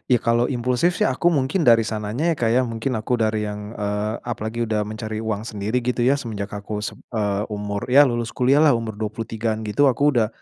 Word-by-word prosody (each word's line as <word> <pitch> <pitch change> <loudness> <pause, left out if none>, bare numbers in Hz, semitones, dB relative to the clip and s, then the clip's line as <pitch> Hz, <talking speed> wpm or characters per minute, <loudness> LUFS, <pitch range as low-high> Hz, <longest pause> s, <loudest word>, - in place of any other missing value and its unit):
ya - - +1
kalau 120 +1 +2
impulsif 125 +7 0
sih - - 0
aku 135 +6 0
mungkin 155 +1 +1
dari 115 -1 +6
sananya 110 +9 -1
ya - - 0
Kak 115 - +2
ya 130 - +5
mungkin 115 +1 -3
aku 125 +3 0
dari 110 -1 +1
yang 105 0 -6
eee, 105 +1 -2
apalagi 115 0 -3
udah 105 -1 0
mencari 110 0 -5
uang 110 -1 -2
sendiri 105 +4 -2
gitu 125 0 0
ya 135 +3 +4
semenjak 105 -5 -5
aku 105 +1 -5
sem - - -4 0.2
eee, 105 -3 0
umur 105 +1 -4
ya 140 +3 +8
lulus 120 -1 -2
kuliahlah 140 +4 +4
umur 115 -2 -4
23-an 110 0 -3
gitu 125 +7 +2
aku 145 +4 +2
udah, 110 -2 +3
115 Hz, 205 wpm, -22 LUFS, 105-125 Hz, 0.2 s, ya